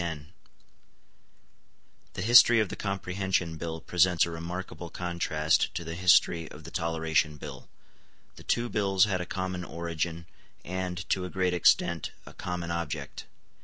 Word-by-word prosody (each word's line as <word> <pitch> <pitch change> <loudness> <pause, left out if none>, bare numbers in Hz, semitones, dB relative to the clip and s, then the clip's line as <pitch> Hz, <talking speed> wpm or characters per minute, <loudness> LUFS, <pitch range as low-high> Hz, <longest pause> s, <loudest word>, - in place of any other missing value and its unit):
The 90 - -4
history 120 +1 +8
of 105 -4 +1
the - - -5
Comprehension 95 -3 -2
Bill 80 0 -5
presents 90 +1 +3
a 85 - -6
remarkable 85 +1 -6
contrast 85 -3 0
to 85 - -3
the 80 0 -6
history 85 -2 +3
of - - -12
the - - -10
Toleration 80 -2 0
Bill. - - -9 0.7
The - - -13
two 120 0 0
bills 100 -4 +2
had 95 -3 -1
a 90 - -5
common 95 -1 -3
origin, 85 0 -4 0.4
and, 90 -1 -4
to 95 - +1
a 90 - -4
great 90 -1 0
extent, 85 -1 +2
a - - -12
common 90 -1 -4
object. 85 -4 -4
90 Hz, 140 wpm, -28 LUFS, 85-95 Hz, 0.7 s, history